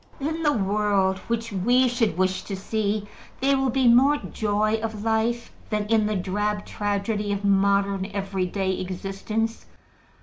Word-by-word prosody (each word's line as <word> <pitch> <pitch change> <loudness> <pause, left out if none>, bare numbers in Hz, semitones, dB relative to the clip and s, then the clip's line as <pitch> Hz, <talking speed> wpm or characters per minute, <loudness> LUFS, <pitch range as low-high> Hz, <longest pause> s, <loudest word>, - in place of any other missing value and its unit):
In 315 +4 -2
the 300 -2 +3
world 200 -3 +1
which 230 0 -2
we 245 +7 +3
should 230 -7 0
wish 185 0 +1
to 200 - -4
see, 205 +1 -2 0.3
there 275 +1 +3
will 265 -1 +1
be 260 +1 +2
more 265 +5 +6
joy 215 -3 0
of 220 -2 -4
life 230 +1 0 0.2
than 210 -1 -1
in 220 -2 +3
the 215 - -1
drab 205 +2 -1
tragedy 205 0 -2
of 200 0 -2
modern 200 0 +2
every 195 -2 -2
day 190 0 -1
existence. 195 +5 -3
210 Hz, 155 wpm, -25 LUFS, 195-230 Hz, 0.3 s, more